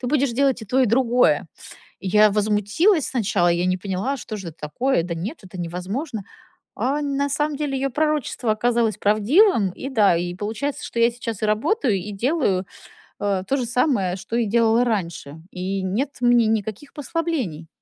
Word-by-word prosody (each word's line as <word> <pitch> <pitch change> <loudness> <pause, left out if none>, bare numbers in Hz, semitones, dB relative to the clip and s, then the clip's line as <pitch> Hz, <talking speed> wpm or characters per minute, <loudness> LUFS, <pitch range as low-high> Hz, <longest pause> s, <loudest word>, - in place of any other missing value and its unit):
ты 250 - -3
будешь 280 -3 +1
делать 265 0 +1
и 220 - -7
то 255 +6 +1
и 255 - +4
другое". 230 - +3 0.5
Я 210 +3 +4
возмутилась 210 - +2
сначала, 205 -7 +1
я 175 +1 +2
не 185 0 +1
поняла: 200 +9 -2
что 215 -3 -6
же 185 -4 -6
это 160 - -16
такое? 205 - 0
Да 170 -1 -4
нет, 210 - -5
это 185 -1 -10
невозможно. 195 - -4 0.5
А 275 +6 -1
на 280 0 -1
самом 295 +1 -1
деле 285 -2 -2
её 270 +1 -1
пророчество 295 -5 0
оказалось 230 0 +1
правдивым, 215 - +3
и 270 +8 -7
да, 205 -8 +4
и 175 +1 -2
получается, 220 +9 -4
что 235 - -3
я 235 +1 +5
сейчас 230 -3 -6
и - - +2
работаю, 225 - +1
и 205 +3 -6
делаю, 205 - 0 0.6
э, 195 -2 0
то 275 - +1
же 250 - -1
самое, 235 - +1
что 195 +5 -6
и 235 -1 +2
делала 230 +2 +3
раньше. 170 -9 -3
И 190 +1 -3
нет 210 +10 -1
мне 240 -1 +4
никаких 220 +5 -3
послаблений. 285 - -3
225 Hz, 180 wpm, -22 LUFS, 195-270 Hz, 0.6 s, я